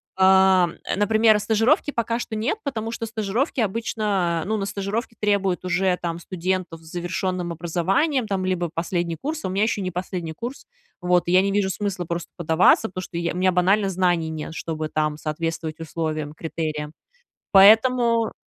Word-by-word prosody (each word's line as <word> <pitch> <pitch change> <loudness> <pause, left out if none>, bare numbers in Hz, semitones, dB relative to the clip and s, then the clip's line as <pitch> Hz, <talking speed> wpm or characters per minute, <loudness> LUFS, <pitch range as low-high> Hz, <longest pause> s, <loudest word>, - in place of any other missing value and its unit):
а, 190 -1 +5 0.2
э, - - -1
например, 215 +1 +4
стажировки 225 - +2
пока 230 -2 -1
что 230 - -5
нет, 230 - -1
потому 225 -5 -3
что 230 - -4
стажировки 225 +5 -2
обычно 200 -5 -1
Ну 215 +3 -1
на 200 - -2
стажировки, 205 +4 -3
требуют 200 -3 0
уже, 180 0 +1
там, 170 -1 -3
студентов 180 -1 -3
с - - -20
завершенным 180 0 -2
образованием, 185 - 0
там, 190 -2 -1
либо 180 -2 -1
последний 170 0 -2
курс, 315 +2 -4
а - - -1
у - - -4
меня 195 +2 +1
еще 215 -2 0
не 185 - -2
последний 180 -2 -4
курс, 240 - -7 0.4
вот, 180 -1 +2
и - - 0
я 185 +1 +6
не 200 +1 0
вижу 200 -1 +1
смысла 190 -3 -3
просто 170 0 -4
подаваться, 165 +7 +4
потому 185 0 -6
что 175 - -7
я 170 0 -1
у - - -6
меня 185 +1 +3
банально 195 +3 +2
знаний 175 -3 +1
нет, 160 0 -6
чтобы, 160 -1 -4
там, 155 -1 -1
соответствовать 160 +1 -4
условиям, 155 -2 -3
критериям. 155 -2 -4 0.6
Поэтому 230 +3 +5
185 Hz, 175 wpm, -23 LUFS, 170-215 Hz, 0.6 s, я